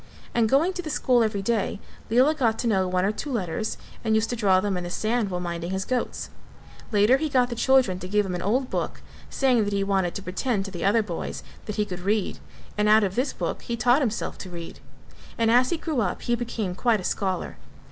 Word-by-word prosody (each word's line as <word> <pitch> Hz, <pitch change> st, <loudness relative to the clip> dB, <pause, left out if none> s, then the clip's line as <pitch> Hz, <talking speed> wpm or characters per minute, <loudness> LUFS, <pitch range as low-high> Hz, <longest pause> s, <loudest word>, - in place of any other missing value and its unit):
And 230 Hz, -2 st, +2 dB
going 315 Hz, +9 st, +3 dB
to 365 Hz, -, -4 dB
the 320 Hz, -, -6 dB
school 250 Hz, -4 st, +2 dB
every 210 Hz, -3 st, -1 dB
day 210 Hz, -2 st, 0 dB, 0.3 s
Lela 255 Hz, +7 st, +4 dB
got 235 Hz, -7 st, +1 dB
to 240 Hz, -, -1 dB
know 190 Hz, -4 st, +2 dB
one 180 Hz, 0 st, +1 dB
or 200 Hz, -, +2 dB
two 280 Hz, +7 st, -5 dB
letters 215 Hz, -2 st, -2 dB, 0.3 s
and 220 Hz, -1 st, +2 dB
used 220 Hz, +2 st, +1 dB
to -, -, -1 dB
draw 195 Hz, -5 st, +4 dB
them 195 Hz, 0 st, -1 dB
in 180 Hz, -, -3 dB
the 175 Hz, -, -5 dB
sand 220 Hz, +3 st, 0 dB
while 180 Hz, -1 st, -2 dB
minding 170 Hz, -1 st, -4 dB
his 190 Hz, 0 st, -2 dB
goats; 255 Hz, -1 st, -2 dB, 0.6 s
later 210 Hz, +5 st, +5 dB
he 310 Hz, +2 st, -2 dB
got 250 Hz, -3 st, +3 dB
the -, -, -2 dB
children 250 Hz, -7 st, +3 dB
to 180 Hz, -, -6 dB
give 210 Hz, +2 st, +2 dB
him 185 Hz, -, -3 dB
an 175 Hz, -, -3 dB
old 250 Hz, +7 st, 0 dB
book -, -, -3 dB, 0.3 s
saying 255 Hz, -5 st, +2 dB
that 205 Hz, 0 st, -2 dB
he 200 Hz, 0 st, +1 dB
wanted 195 Hz, -3 st, 0 dB
to 200 Hz, -, -5 dB
pretend 195 Hz, +2 st, -1 dB
to 195 Hz, -, -6 dB
the 175 Hz, -, -5 dB
other 215 Hz, +3 st, +3 dB
boys 175 Hz, -5 st, -5 dB, 0.2 s
that 210 Hz, -, -3 dB
he 210 Hz, -, +1 dB
could 180 Hz, -3 st, -6 dB
read 200 Hz, +2 st, -1 dB, 0.4 s
and 210 Hz, 0 st, +3 dB
out 215 Hz, 0 st, +6 dB
of 190 Hz, -2 st, 0 dB
this 255 Hz, +7 st, 0 dB
book -, -, -4 dB
he 235 Hz, -, -4 dB
taught 245 Hz, +5 st, +4 dB
himself 230 Hz, -5 st, -2 dB
to 185 Hz, -, -7 dB
read: 170 Hz, -1 st, -8 dB, 0.6 s
and 225 Hz, -1 st, +3 dB
as 250 Hz, +2 st, +5 dB
he 340 Hz, -, 0 dB
grew 315 Hz, -6 st, -1 dB
up 185 Hz, -4 st, -2 dB
he 240 Hz, -, 0 dB
became 230 Hz, -5 st, -2 dB
quite 225 Hz, +3 st, +2 dB
a -, -, -7 dB
scholar. 190 Hz, -1 st, -2 dB
215 Hz, 240 wpm, -25 LUFS, 190-245 Hz, 0.6 s, out